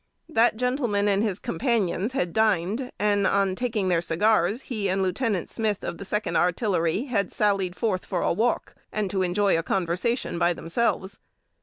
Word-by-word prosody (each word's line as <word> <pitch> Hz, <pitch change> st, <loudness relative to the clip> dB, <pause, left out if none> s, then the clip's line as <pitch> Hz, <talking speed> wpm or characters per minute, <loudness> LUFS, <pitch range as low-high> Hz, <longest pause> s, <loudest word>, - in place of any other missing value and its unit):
That 235 Hz, -8 st, +2 dB
gentleman 245 Hz, -5 st, 0 dB
and 200 Hz, 0 st, +2 dB
his 210 Hz, -4 st, 0 dB
companions 220 Hz, 0 st, -1 dB
had 180 Hz, -10 st, -1 dB
dined, 220 Hz, +3 st, +1 dB
and, 205 Hz, -1 st, +2 dB
on 195 Hz, -1 st, +2 dB
taking 220 Hz, -2 st, -1 dB
their 175 Hz, -2 st, +2 dB
cigars, 205 Hz, +6 st, +1 dB
he 210 Hz, -6 st, -2 dB
and 190 Hz, +1 st, +1 dB
Lieut. 190 Hz, 0 st, -1 dB
Smith, 215 Hz, -3 st, -2 dB
of -, -, -5 dB
the 200 Hz, -, -7 dB
Second 210 Hz, +2 st, -2 dB
Artillery, 180 Hz, +1 st, +1 dB
had 220 Hz, -9 st, -1 dB
sallied 195 Hz, -4 st, 0 dB
forth 195 Hz, -5 st, -1 dB
for -, -, -2 dB
a -, -, +2 dB
walk, 230 Hz, +7 st, 0 dB, 0.2 s
and 210 Hz, -3 st, -2 dB
to 195 Hz, -2 st, 0 dB
enjoy 185 Hz, -1 st, +2 dB
conversation 180 Hz, +4 st, -1 dB
by 175 Hz, 0 st, +3 dB
themselves. 190 Hz, +3 st, -2 dB
200 Hz, 165 wpm, -25 LUFS, 180-225 Hz, 0.2 s, by